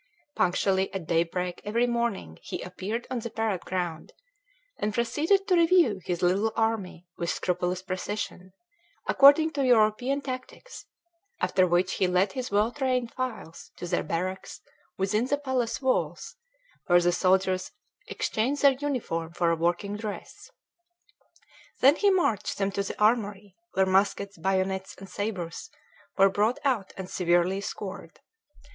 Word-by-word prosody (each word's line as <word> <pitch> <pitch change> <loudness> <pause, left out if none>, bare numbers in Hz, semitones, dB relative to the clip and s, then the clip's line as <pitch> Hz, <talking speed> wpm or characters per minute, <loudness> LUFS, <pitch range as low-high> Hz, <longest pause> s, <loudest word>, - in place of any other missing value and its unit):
Punctually 190 +1 +1
at 185 -4 -4
daybreak 170 +2 -1
every 230 +4 +1
morning 235 - -2
he - - -6
appeared 205 +6 -4
on 250 - -1
the 235 - -5
parade 220 -4 -1
ground, 175 -3 -4 0.7
and 210 0 -1
proceeded 315 - +1
to 370 - +4
review 335 - +4
his 175 +1 -3
little 195 +5 +2
army 220 -6 -1
with 170 - -1
scrupulous 180 +1 -1
precision, 185 0 -5 0.6
according 290 +3 +6
to 285 -2 -1
European 245 +2 +3
tactics; 265 - -8 0.5
after 185 0 +2
which 180 +2 +1
he 185 - +2
led 180 +2 +2
his 255 +2 -4
well 210 +3 +2
trained 255 -3 -1
files 250 -10 -5
to - - -7
their 175 0 0
barracks 185 +3 -4 0.4
within 210 +5 0
the 285 - +1
palace 260 -3 -2
walls, 360 - -1 0.5
where 175 -1 +6
the 175 0 +2
soldiers 185 0 +1 0.4
exchanged 265 +7 -1
their 280 - +8
uniform 255 - -3
for 170 0 +1
a - - +2
working 175 +5 -1
dress. 210 -1 -7 1.3
Then 275 +4 +6
he 410 - +3
marched 350 - +1
them 195 0 0
to 200 - -1
the 200 - -5
armory, 210 -3 +1 0.2
where 190 - +4
muskets, 200 +1 +1
bayonets, 190 +1 -1
and 195 - -10
sabres 200 -1 -5 0.5
were 195 - +7
brought 215 +6 +1
out 230 -8 0
and 190 -1 -5
severely 180 +2 +1
scoured. 200 -1 -7
200 Hz, 140 wpm, -27 LUFS, 185-245 Hz, 1.3 s, their